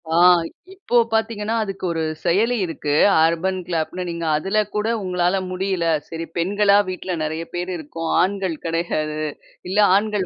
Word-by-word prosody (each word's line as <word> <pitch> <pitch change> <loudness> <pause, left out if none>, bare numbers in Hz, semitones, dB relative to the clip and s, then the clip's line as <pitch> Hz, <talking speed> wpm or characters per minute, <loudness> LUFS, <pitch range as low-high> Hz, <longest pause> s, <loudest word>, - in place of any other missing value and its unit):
ஆ. - - +3 0.6
இப்போ 380 -10 -4 0.2
பார்த்தீங்கன்னா, 220 0 0
அதுக்கு 195 -2 -5
ஒரு 165 -1 -1 0.2
செயலி 215 +8 +2
இருக்கு, 150 -3 -3 0.3
அர்பன் 180 +3 0
கிளாப்னு. 175 +1 -2
நீங்க 170 0 -4
அதுல 195 +6 -2 0.2
கூட 210 +1 0 0.2
உங்களால 180 0 +1
முடியல 185 -2 -1 0.2
சரி, 165 0 -5
பெண்களா 200 +3 +3
வீட்ல 185 0 -4
நெறைய 160 +2 -3
பேரு 175 +1 -3
இருக்கோம். 165 +1 -6
ஆண்கள் 190 -2 0
கெடையாது. 165 -2 -2 0.5
இல்ல 195 +3 0 0.2
ஆண்கள் 210 -1 +1
185 Hz, 140 wpm, -21 LUFS, 165-200 Hz, 0.6 s, ஆ